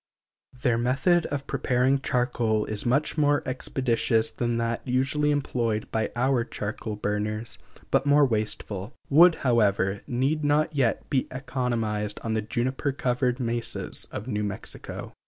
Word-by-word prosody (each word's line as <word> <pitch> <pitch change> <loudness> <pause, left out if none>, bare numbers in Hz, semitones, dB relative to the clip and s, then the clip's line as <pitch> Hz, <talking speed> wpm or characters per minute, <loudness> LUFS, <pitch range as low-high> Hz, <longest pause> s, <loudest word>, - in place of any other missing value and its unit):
Their 120 -4 +2
method 140 +8 +2
of 140 -1 -4
preparing 130 0 +1
charcoal 120 -4 0
is 110 +2 -2
much 140 +5 +1
more 145 -1 +3
expeditious 120 -3 0
than 120 -1 -1
that 115 0 -1
usually 135 +3 +1
employed 120 -7 -1
by 110 -1 0
our 125 0 +2
charcoal 110 -1 -5
burners, 105 +2 -3 0.3
but 140 - +2
more 145 0 +6
wasteful; 105 -2 -2 0.2
wood, 165 +4 +7
however, 100 -5 +2
need 135 +5 0
not 150 +2 +2
yet 125 -5 +1
be 135 -3 +1
economized 115 -5 -2
on 115 - -1
the 110 - +1
juniper 130 +5 -1
covered 125 -1 0
mesas 120 -1 -2
of 105 - -7
New 105 -4 -1
Mexico. 100 -2 -5
125 Hz, 140 wpm, -26 LUFS, 110-135 Hz, 0.3 s, wood